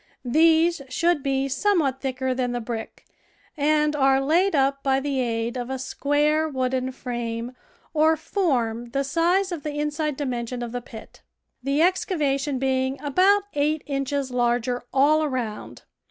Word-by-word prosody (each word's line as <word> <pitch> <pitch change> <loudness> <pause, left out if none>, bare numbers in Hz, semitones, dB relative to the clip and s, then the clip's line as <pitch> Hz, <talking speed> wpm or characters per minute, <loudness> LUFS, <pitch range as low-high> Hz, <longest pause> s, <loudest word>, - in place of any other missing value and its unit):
These 325 +4 +4
should 335 +4 +1
be 270 0 0
somewhat 280 -2 +1
thicker 260 -1 -1
than 250 -1 -1
the 245 - -1
brick, 225 -1 -6 0.5
and 300 0 +2
are 270 -1 +4
laid 330 +7 +2
up 275 0 +2
by 270 -1 +2
the 275 -1 -2
aid 230 -1 -1
of 245 0 -4
a 265 - -2
square 295 +4 +1
wooden 260 -1 -1
frame 240 -2 -4 0.4
or 315 +1 +3
form 240 - -1
the 275 0 +1
size 345 +7 +1
of 340 -4 -4
the 295 0 -5
inside 300 -1 -2
dimension 245 -3 -3
of 235 - -5
the 245 0 -4
pit, 225 -2 -12 0.4
the 275 +4 +1
excavation 300 -7 0
being 265 +1 0
about 375 +8 +3
eight 295 +1 0
inches 275 -1 -2
larger 245 0 0
all 295 +4 +4
around. 250 -7 -4
275 Hz, 150 wpm, -24 LUFS, 255-305 Hz, 0.5 s, These